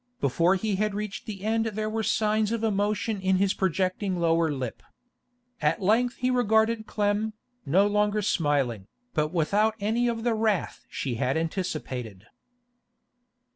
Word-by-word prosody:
Before 165 +7 +2
he 200 0 -1
had 210 0 0
reached 210 -1 -5
the 200 -3 -6
end 225 +1 +1
there 215 0 -2
were 220 +1 -1
signs 215 0 +1
of 230 -1 -2
emotion 210 0 0
in 190 0 +2
his 195 +1 +2
projecting 185 +1 0
lower 165 -1 +2
lip. 130 -5 -4 0.8
At 150 +1 +2
length 230 +6 +2
he 255 +1 0
regarded 220 -2 +2
Clem, 210 +1 0 0.3
no 185 +8 +4
longer 210 0 +1
smiling, 140 - 0 0.3
but 150 0 +1
without 205 +6 +2
any 225 +4 +1
of 230 -1 -2
the 240 -1 +2
wrath 215 -3 -1
she 130 - -3
had 130 +5 0
anticipated. 135 - -4
205 Hz, 145 wpm, -27 LUFS, 165-220 Hz, 0.8 s, no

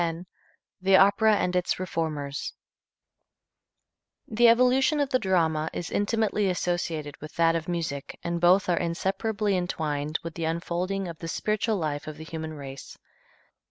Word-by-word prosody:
X 165 -1 -1 0.6
The 190 +1 +5
Opera 215 +3 +5
and 180 -2 0
Its 180 0 0
Reformers 155 -6 -3 1.7
The 235 +2 +4
evolution 255 +5 +4
of 285 -2 +1
the 255 - +3
drama 160 -5 +1
is 170 - -5
intimately 210 -1 +1
associated 170 -5 -2
with 155 - -9
that 165 0 +3
of 165 -1 -3
music 160 -6 -3
and 170 0 -2
both 180 +3 +5
are 175 -2 +2
inseparably 195 +4 -1
entwined 155 -4 -2
with 165 -1 -6
the 165 0 -3
unfolding 180 +4 -2
of 165 -2 -8
the 165 - -6
spiritual 215 +4 0
life 150 -4 -3
of 155 -1 -6
the 160 - -8
human 160 -1 -6
race. 135 -2 -9
170 Hz, 150 wpm, -27 LUFS, 160-195 Hz, 1.7 s, The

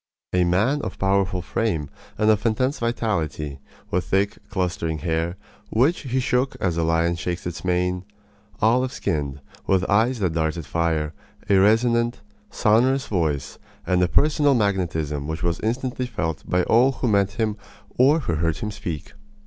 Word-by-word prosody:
A 90 -1 +3
man 105 +12 +2
of - - -5
powerful 95 -2 +1
frame 85 -9 -1 0.3
and 110 - +2
of 105 -1 +1
intense 130 +5 +1
vitality, 85 - -2 0.3
with 90 -1 0
thick, 95 +6 0
clustering 90 -4 -1
hair, 80 +2 -1 0.3
which 135 +10 +2
he 130 -1 -2
shook 125 +1 0
as 90 -4 0
a 85 - 0
lion 85 +1 +2
shakes 90 0 -4
its 85 -1 -5
mane; 90 0 0 0.6
olive 125 +3 +3
skinned, 70 - -2 0.3
with 95 -1 +2
eyes 115 +5 +3
that 95 -6 0
darted 80 0 -1
fire, 80 -2 -1 0.4
a 100 - +6
resonant, 115 +4 +3 0.3
sonorous 130 +5 +2
voice, 80 -8 -2 0.3
and 90 -1 +2
a 90 - +4
personal 145 - +3
magnetism 85 - -1
which 80 +2 -4
was 85 -1 0
instantly 125 +2 -2
felt 80 - -3
by 90 0 +2
all 125 +7 +4
who 130 - -2
met 100 -2 +2
him 110 -1 -1 0.4
or 145 +6 +4
who 85 - -2
heard 80 0 0
him 105 - -4
speak. 85 -7 -6
95 Hz, 155 wpm, -23 LUFS, 85-115 Hz, 0.6 s, a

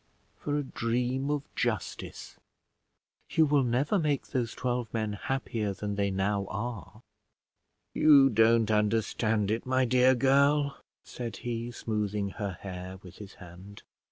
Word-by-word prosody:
For 145 0 -2
a 145 - -1
dream 125 +2 -1
of 145 -1 -1
justice. - - -3 0.9
You 160 - +4
will 145 -1 +3
never 130 - +1
make 150 -4 0
those 120 -4 -2
twelve 125 -2 -2
men 110 -2 -2
happier 110 -2 -2
than 105 +1 -4
they 100 0 0
now 100 +1 -1
are." 115 -9 -6 0.9
"You 140 -3 +6
don't 115 0 +4
understand 105 0 +1
it, 115 +3 -2
my 130 0 +2
dear 130 +2 +4
girl," 140 +3 +3 0.2
said 120 -2 -6
he, 120 0 -3
smoothing 105 -4 -2
her 100 -2 -2
hair 95 -1 -7
with 90 -1 -13
his 100 -2 -11
hand. 95 +3 -13
115 Hz, 135 wpm, -29 LUFS, 105-130 Hz, 0.9 s, You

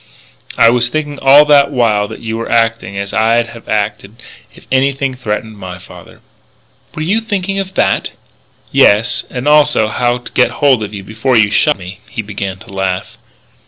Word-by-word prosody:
"I 115 - +6
was 120 0 +1
thinking 145 0 -4
all 140 +2 +7
the 145 -1 +5
while 110 -6 +1
that 110 - -10
you 115 -1 -4
were 115 0 -5
acting 115 -3 0
as 100 0 -5
I'd 115 +1 +2
have 115 - -13
acted 105 0 -2 0.4
if - - -18
anything 135 0 +1
threatened 110 -3 -5
my 90 -2 -7
father." 90 - -15 0.7
"Were 155 - -3
you 205 +8 0
thinking 195 -3 -2
of 190 -1 -5
that?" - - +1 0.6
"Yes, 110 +4 +3
and 125 +3 -5
also 150 -7 +4
how 120 +2 0
to 120 - -11
get 125 - +3
hold 135 -5 +3
of 105 - -6
you 100 -2 -7
before 115 +5 0
you 105 -2 +3
shot 150 +6 +2
me." 95 +2 -10
He 115 -4 -5
began 100 -2 -5
to 105 +1 -15
laugh. 95 -1 -3
115 Hz, 180 wpm, -14 LUFS, 105-140 Hz, 0.7 s, all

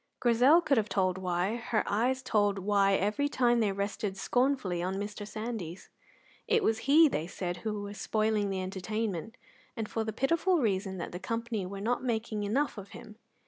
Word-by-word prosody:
Grizel 250 +8 +5
could 280 -5 +2
have 215 -1 +1
told 185 -1 +1
why; 185 +4 -1
her 230 -1 -1
eyes 250 +5 0
told 205 -5 +2
why 195 0 +3
every 210 +10 0
time 240 -3 +2
they 215 -3 +2
rested 200 0 -3
scornfully 245 -6 0
on 185 +2 -2
Mr. 205 +1 -5
Sandys. 215 -6 -6 0.6
It 455 -1 +3
was 225 0 +2
he, 315 +3 +8
they 165 - -2
said, 175 -1 -4
who 210 +1 -4
was 200 -1 -7
spoiling 215 -2 +1
the 190 -1 -2
entertainment, 210 +2 -3 0.4
and 220 -2 -2
for 225 - -2
the 220 - -3
pitiful 335 - +2
reason 195 - 0
that 170 - -5
the 180 - -6
company 230 0 -3
were 195 +1 -7
not 245 +4 0
making 220 -3 -2
enough 230 +4 0
of 200 0 -10
him. 215 0 -12
210 Hz, 185 wpm, -30 LUFS, 195-240 Hz, 0.6 s, he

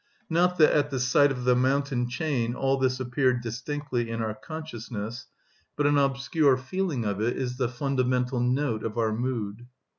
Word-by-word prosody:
Not 180 +2 +3
that 155 - +6
at 145 -1 +2
the 135 -2 -2
sight 130 +3 +4
of 125 -2 -4
the 125 0 +4
mountain 130 -1 +1
chain 125 -3 -1
all 135 0 +1
this 130 -1 +1
appeared 130 -1 +1
distinctly 120 +1 -3
in 115 0 -3
our 110 -1 -1
consciousness, 120 -6 -7 0.5
but 145 - 0
an 145 0 +4
obscure 140 +1 +2
feeling 140 -1 -2
of 100 0 -1
it 120 +2 0
is 125 -1 -3
the 125 -2 0
fundamental 125 -1 0
note 125 -1 0
of 115 0 -4
our 110 -2 +1
mood. 115 -1 -3
125 Hz, 175 wpm, -27 LUFS, 120-140 Hz, 0.5 s, that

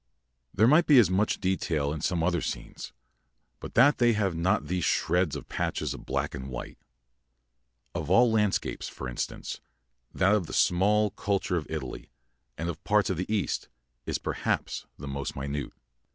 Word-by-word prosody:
] - - -50
There 105 - +5
might 155 +6 +5
be 145 - +7
as 110 -6 +6
much 100 +3 +1
detail 80 -6 0
in 75 - -5
some 85 -3 0
other 85 -1 +1
scenes, - - -5 0.7
but - - -9
that 140 +6 +6
they 120 -1 +5
have 100 -4 0
not 95 +5 +1
these 90 -1 -2
shreds 90 0 +1
and 75 - -7
patches - - -2
of - - -11
black - - -1
and 65 -1 -6
white. - - -7 1.1
Of 75 0 -4
all 115 +5 +5
landscape, 105 -3 0
for 65 - -6
instance, 60 - -5 0.5
that 95 +2 +3
of 100 -6 +1
the - - -8
small 105 +4 +3
culture 100 -2 -1
of 80 -3 -3
Italy 75 -6 -5 0.5
and 85 - -3
of 85 -3 -5
parts 105 -3 +2
of 95 - -2
the 95 +4 -3
East 105 -3 -1 0.4
is, - - 0
perhaps, - - -2
the 70 - -8
most 70 0 -4
minute. 70 0 -4
90 Hz, 175 wpm, -28 LUFS, 75-105 Hz, 1.1 s, be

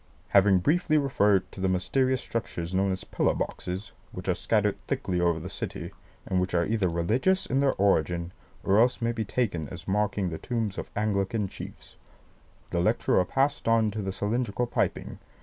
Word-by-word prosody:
Having 95 -2 +5
briefly 155 - +2
referred 105 -9 +2
to 95 - -9
the 95 - +2
mysterious 130 +8 +1
structures 90 -6 -4
known 95 +1 +2
as 95 0 -3
'pillar - - 0
boxes,' 95 +3 -4 0.2
which - - -8
are - - +3
scattered - - +1
thickly 90 -2 -1
over 85 -2 +2
the 85 - -6
city, 95 - -5 0.3
and 90 -1 0
which 90 -1 -1
are 85 0 +3
either 105 -3 +1
religious 115 - +1
in 135 - 0
their 140 -1 +3
origin, 85 -3 +1 0.3
or 100 +2 +4
else 125 +2 +3
may 115 -1 0
be 115 -1 -2
taken 100 - -1
as 85 0 -9
marking 100 -1 0
the 80 - -5
tombs 115 -5 -2
of - - -6
Anglican 105 0 0
chiefs, - - -10 0.7
the 85 - 0
lecturer 95 -1 +2
passed 135 +7 0
on 115 -2 +3
to 105 +1 -4
the 95 -1 -3
cylindrical 115 +3 -1
piping. 120 - -2
100 Hz, 180 wpm, -27 LUFS, 90-115 Hz, 0.7 s, Having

